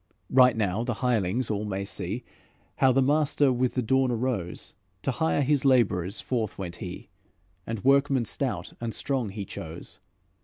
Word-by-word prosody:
'" - - -44
"Right 130 -2 +6
soon 105 +2 0
the 120 -2 -1
hirelings 115 0 +1
all 105 0 -1
may 100 -2 -3
see 100 +5 -5 0.5
How 130 - +5
the 135 +1 +3
master 145 -1 +3
with 125 0 0
the 130 - +1
dawn 130 +3 +2
arose; 115 -7 -3 0.3
To 135 - +1
hire 160 +2 +1
his 140 0 +2
labourers 110 -8 +2
forth 115 -5 -2
went 90 -3 -6
he, 90 0 -8 0.6
And 115 -3 -4
workmen 135 -2 +3
stout - - -2
and 115 -1 -3
strong 130 -6 -1
he 100 0 -5
chose. 85 0 -8
120 Hz, 165 wpm, -27 LUFS, 100-130 Hz, 0.6 s, Right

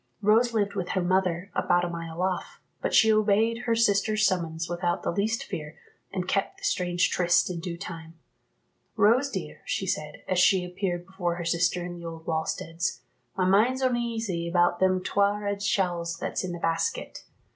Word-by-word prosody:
Rose 225 +4 +4
lived 205 -3 0
with 185 -3 -3
her 185 - 0
mother, 185 0 0
about 175 0 +2
a - - -2
mile 165 0 -5
off, 185 -1 -2 0.2
but - - -1
she 220 -1 +6
obeyed 215 +2 +2
her 230 -1 +2
sister's 215 -1 +2
summons 165 -3 -1
without 175 0 -1
the - - 0
least 215 +5 0
fear, 150 0 -7 0.3
and 185 -2 -3
kept 195 - -1
the - - -18
strange 175 -1 +1
tryste 175 0 +3
in 175 - -4
due 170 0 -5
time. 165 -2 -8 0.8
"Rose, 230 +6 +4
dear," - - -6
she - - -2
said, - - -3
as 185 -1 +1
she 185 0 +4
appeared 180 -1 -3
before 180 -3 -2
her 175 -1 -5
sister 175 +1 +1
in 175 - -5
the 170 -1 -10
old 165 -1 -7
wallsteads, 165 +1 -2 0.4
"my 185 - +2
mind's 230 +8 +3
oneasy 230 -8 -1
about 175 0 +2
them 185 -1 +2
twa' 200 +2 +2
red 200 -1 -3
shawls 175 -4 0
that's - - -3
in 185 - -3
the 175 - -4
basket. 165 0 -2
185 Hz, 180 wpm, -27 LUFS, 170-205 Hz, 0.8 s, she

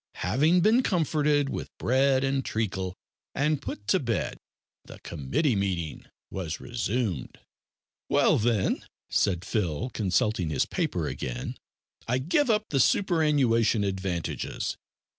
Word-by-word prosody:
Having 155 +9 +3
been 220 +7 +5
comforted 150 - +2
with - - -4
bread 130 +1 +3
and 135 0 +1
treacle, 95 -5 -2 0.4
and 145 +1 +1
put 105 - -6
to - - +4
bed, 115 -4 -2 0.4
the - - -12
committee 85 - 0
meeting 90 -6 -2 0.2
was 85 -5 -4
resumed. 115 - -2 0.7
"Well, - - +4
then," 110 -3 +1 0.3
said 90 -2 +1
Phil, 105 - -1
consulting 95 -3 +1
his 75 - +1
paper - - -1
again, - - -4 0.5
"I 125 +2 +2
give 180 - +1
up 215 -1 +2
the 140 - +1
superannuation 135 - +3
advantages. 95 -3 -2
115 Hz, 120 wpm, -27 LUFS, 95-145 Hz, 0.7 s, been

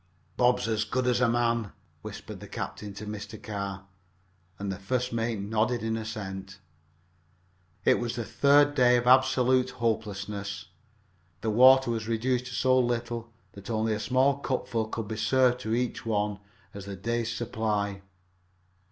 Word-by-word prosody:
"Bob's 125 -1 +2
as 110 -1 +1
good 125 +4 -1
as 125 0 +2
a 120 - +4
man," 115 -3 0 0.3
whispered - - -8
the - - -10
captain 105 -1 -6
to 100 +2 -8
Mr. 105 +1 -7
Carr, 100 -2 -5 0.7
and 100 0 -3
the 95 - -5
first 125 +5 -2
mate 115 -1 -1
nodded 110 +4 0
an 110 0 -1
assent. 95 -4 -6 1.3
It - - +4
was 120 0 -3
the 120 -1 -3
third 145 +6 +4
day 125 -3 +5
of 120 - -1
absolute 130 0 +4
hopelessness. 100 -3 -3 0.7
The 110 - 0
water 130 +2 +6
was 110 -2 -3
reduced 125 +2 0
to 125 - -6
so 130 0 +3
little 120 -1 -2 0.2
that 100 +1 -11
only 110 -1 0
a 105 - -2
small 130 +4 +2
cupful 120 -5 -2
could 110 -1 -4
be 110 0 -4
served 125 +2 +3
to 110 -2 -1
each 125 -1 -2
one 105 -2 -1 0.3
as 100 -1 -8
the 100 - -5
day's 115 +4 -2
supply. 105 -4 -2
115 Hz, 155 wpm, -28 LUFS, 105-125 Hz, 1.3 s, water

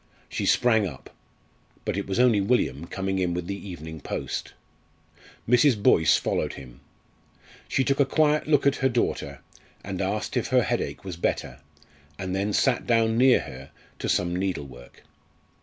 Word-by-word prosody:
She - - -3
sprang 110 -4 +3
up. 70 -7 -11 0.7
But - - -1
it 100 - -3
was 95 +2 -2
only 120 -5 +4
William 90 - 0
coming 95 -1 -2
in 90 -2 0
with 90 -1 -3
the 100 +1 -6
evening 80 -2 -8
post. - - -4 0.9
Mrs. 125 +1 +4
Boyce 80 -5 +4
followed - - -1
him. 60 -3 -12 0.9
She 130 - +1
took 140 +1 0
a 140 - +5
quiet 150 +1 +2
look 145 -3 +3
at 140 0 +3
her 130 - +2
daughter, 120 -1 -2 0.4
and - - -4
asked - - -2
if - - 0
her - - +3
headache - - -3
was 90 -3 -6
better, 65 -6 -2 0.6
and 95 -1 -3
then 100 +2 -1
sat 125 +3 +1
down 115 -1 +3
near 125 +2 +5
her 65 +2 -10 0.3
to - - -3
some 90 0 +1
needlework. 70 -10 -5
100 Hz, 160 wpm, -25 LUFS, 85-125 Hz, 0.9 s, a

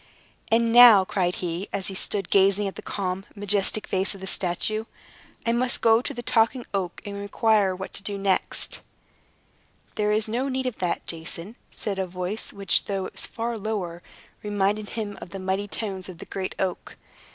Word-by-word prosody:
"And 230 0 +3
now," 235 -5 +10
cried 180 -2 0
he, 175 +2 -4
as 195 -1 -2
he 195 - 0
stood 195 0 -2
gazing 200 +1 +4
at 195 - -4
the - - -7
calm, 190 -2 -3
majestic 205 +1 0
face 190 +1 0
of 195 - -12
the - - -5
statue, 190 +4 0 0.6
"I 230 - +2
must 245 +1 +1
go 225 0 +5
to - - -2
the 240 - -6
Talking 230 +2 +2
Oak 185 -3 -2
and 200 -1 -5
inquire 205 -1 +2
what 190 +1 -6 0.2
next 195 -1 0
to - - -4
do." - - -28 1.1
"There 210 -1 +1
is 215 +1 +2
no 245 +5 -1
need 260 0 -2
of 250 -3 -3
that, 180 -2 -1
Jason," 170 +5 -4
said 200 -3 -4
a 190 - -1
voice 180 +4 -4
which, 195 -2 +1
though 195 -2 -2
it - - -6
was - - +2
far 235 +1 -3
lower, 195 -5 -3 0.4
reminded 205 0 0
him 210 -2 -5
of - - -8
the 195 - -7
mighty 190 +2 -1
tones 195 -3 -4
of 180 - -9
the - - -9
great 190 -1 -4
oak. 185 -2 -3
200 Hz, 190 wpm, -25 LUFS, 190-220 Hz, 1.1 s, now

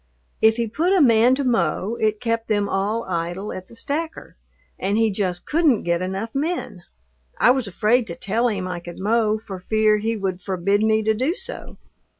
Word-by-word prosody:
If 220 0 +5
he 235 0 -1
put 325 - 0
a 385 - +4
man 245 -2 +5
to 280 - -2
mow, 220 -3 0
it 215 -1 +1
kept 230 0 -2
them 205 -2 +1
all 205 +4 -1
idle 175 +3 -3
at 185 0 -8
the - - -16
stacker, 315 +7 -4 0.4
and 200 +2 0
he 225 -1 +3
just 185 -3 -2
couldn't 305 -8 +2
get 170 0 0
enough 195 +5 -4
men. 295 - -3 0.6
I 245 - +6
was 255 -3 0
afraid 225 +5 +1
to 170 - -5
tell 225 +7 0
him 195 -5 -2
I 180 -1 -4
could 175 0 -10
mow 215 +1 +1
for 200 -3 -8
fear 215 +2 +2
he 225 +1 -1
would 190 -2 -3
forbid 195 +2 0
me 220 0 +2
to 220 +1 +2
do 260 - 0
so. - - -5
215 Hz, 195 wpm, -22 LUFS, 190-235 Hz, 0.6 s, I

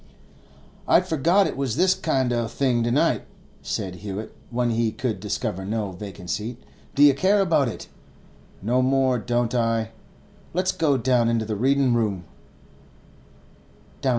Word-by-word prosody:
'I'd - - +4
forgot 170 +6 +3
it - - -3
was 135 -4 -2
this 185 +4 +4
kind 135 -9 0
o' 120 -1 0
thing 125 -1 0
to 115 - 0
night,' 130 +5 +1 0.3
said 90 -1 -4
Hewett, 105 +2 -6
when 120 0 0
he 115 -1 +1
could 115 -4 -3
discover 95 -1 -3
no 105 0 -2
vacant 95 -1 -8
seat. 115 +3 -3 0.4
'Do 145 - +5
you 145 -1 +8
care 190 +9 +2
about 165 -8 +3
it? 115 - -6 0.8
No 125 +5 +2
more 130 -1 +2
don't 120 +1 -1
I; 115 -2 0 0.6
let's 185 +1 +1
go 150 -6 +1
down 120 -1 +2
into 115 -1 0
the 110 0 -3
readin' 135 +3 +2
room. 105 -6 0
120 Hz, 150 wpm, -24 LUFS, 110-135 Hz, 0.8 s, you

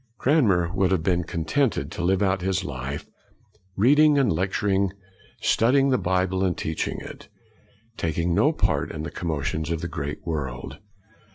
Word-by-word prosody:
Cranmer 100 - +2
would 95 -1 +2
have 95 -4 +1
been 90 0 +1
contented 85 - -1
to - - -5
live 95 +3 +2
out 95 -1 +1
all 90 - -2
his 95 0 0
life, 70 -2 -5 0.7
reading 145 +7 +5
and 135 -10 +3
lecturing, 95 +2 0 0.5
studying 135 +4 +3
the 130 - +2
Bible 95 0 0
and 90 -3 0
teaching 80 0 -2
it, - - -10 0.7
taking 85 +1 -1
no - - +4
part - - 0
in 75 -1 -5
the 80 - -5
commotions 80 -1 -3
of 85 -1 -2
the 85 - -3
great 75 -2 -5
world. 70 -4 -4
90 Hz, 160 wpm, -24 LUFS, 80-100 Hz, 0.7 s, reading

